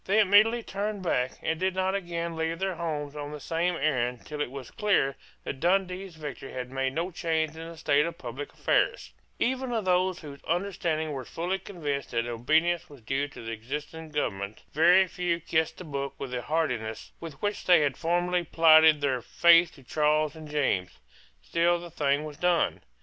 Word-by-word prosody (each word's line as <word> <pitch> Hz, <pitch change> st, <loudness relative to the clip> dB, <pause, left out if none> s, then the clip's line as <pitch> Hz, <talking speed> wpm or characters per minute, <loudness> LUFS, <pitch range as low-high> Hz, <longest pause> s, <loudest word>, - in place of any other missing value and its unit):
They 200 Hz, +3 st, +3 dB
immediately 215 Hz, +3 st, +5 dB
turned 205 Hz, 0 st, -3 dB
back, 125 Hz, -7 st, 0 dB
and 160 Hz, 0 st, -1 dB
did 185 Hz, 0 st, 0 dB
not 190 Hz, 0 st, +1 dB
again 170 Hz, -3 st, -3 dB
leave 160 Hz, +1 st, -1 dB
their 190 Hz, +1 st, -1 dB
homes 150 Hz, -4 st, -4 dB
on 145 Hz, 0 st, -5 dB
the 150 Hz, -, -7 dB
same 170 Hz, +4 st, 0 dB
errand 125 Hz, -5 st, -1 dB
till 150 Hz, -1 st, -5 dB
it 145 Hz, -, -1 dB
was 135 Hz, -1 st, -8 dB
clear 195 Hz, -10 st, +1 dB, 0.3 s
that 135 Hz, -, -5 dB
Dundee's 185 Hz, +1 st, 0 dB
victory 145 Hz, -4 st, -7 dB
had 125 Hz, 0 st, -5 dB
made 135 Hz, 0 st, -1 dB
no 170 Hz, +5 st, -2 dB
change 160 Hz, -2 st, -1 dB
in 165 Hz, +1 st, -7 dB
the 165 Hz, -, -10 dB
state 150 Hz, 0 st, +2 dB
of 170 Hz, -, -6 dB
public 130 Hz, +4 st, -7 dB
affairs, -, -, 0 dB, 0.2 s
Even 260 Hz, +1 st, 0 dB
of 225 Hz, -4 st, -1 dB
those 185 Hz, 0 st, +2 dB
whose 145 Hz, -3 st, -9 dB
understandings 170 Hz, -3 st, -1 dB
were 135 Hz, -3 st, -4 dB
fully 180 Hz, +8 st, -3 dB
convinced 150 Hz, -8 st, -4 dB
that 115 Hz, 0 st, -1 dB
obedience 160 Hz, +9 st, +1 dB
was 140 Hz, -4 st, -14 dB
due 135 Hz, +5 st, -1 dB
to 145 Hz, -, -11 dB
the 115 Hz, -, -4 dB
existing 150 Hz, +8 st, -6 dB
government, 100 Hz, -9 st, -3 dB
very 175 Hz, +5 st, +6 dB
few 175 Hz, -2 st, -1 dB
kissed 160 Hz, -1 st, 0 dB
the -, -, -8 dB
book 140 Hz, -3 st, -4 dB
with 135 Hz, -2 st, -6 dB
the 125 Hz, -1 st, -2 dB
heartiness 125 Hz, -8 st, -2 dB
with 160 Hz, -4 st, -9 dB
which 205 Hz, 0 st, -2 dB
they 175 Hz, -3 st, +6 dB
had 145 Hz, -1 st, +1 dB
formerly 175 Hz, +1 st, 0 dB
plighted 160 Hz, -2 st, +6 dB
their 130 Hz, -3 st, 0 dB
faith 170 Hz, +5 st, +5 dB
to 135 Hz, -, -16 dB
Charles 150 Hz, +2 st, +1 dB
and 155 Hz, -1 st, -10 dB
James. 135 Hz, -12 st, 0 dB, 0.5 s
Still 170 Hz, -, +2 dB
the 170 Hz, 0 st, -9 dB
thing 145 Hz, -2 st, +1 dB
was 150 Hz, -2 st, -8 dB
done. 175 Hz, -1 st, +1 dB
160 Hz, 190 wpm, -28 LUFS, 140-175 Hz, 0.5 s, very